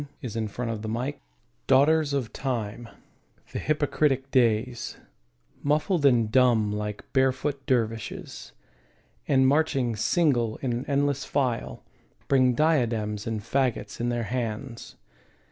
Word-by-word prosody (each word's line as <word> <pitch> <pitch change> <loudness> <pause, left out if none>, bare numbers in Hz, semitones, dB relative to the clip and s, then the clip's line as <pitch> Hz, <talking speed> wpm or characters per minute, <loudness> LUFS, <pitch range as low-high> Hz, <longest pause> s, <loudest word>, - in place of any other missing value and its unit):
Ralph 115 -4 -5 0.2
Waldo 125 - -2
Emerson 110 0 -4
Days 140 +3 -2 0.5
DAUGHTERS 150 +2 +4
of 130 -6 -2
Time, 120 -3 -4 0.6
the - - -3
hypocritic 145 -3 0
Days, 120 -1 +1 0.6
Muffled 150 +2 +2
and 115 -5 +3
dumb 120 -4 +4
like 105 0 -4
barefoot 135 +1 +1
dervishes, 115 - -2 0.8
And 130 -1 +4
marching 135 -5 +1
single 120 - +1
in 125 -2 0
an 120 +2 -3
endless 140 -1 +1
file, 130 -5 -2 0.4
Bring 130 -2 +3
diadems 115 -9 +1
and 110 -2 -2
faggots 130 +1 -1
in 120 - 0
their 120 -1 -1
hands. 115 +1 -4
125 Hz, 115 wpm, -26 LUFS, 115-140 Hz, 0.8 s, DAUGHTERS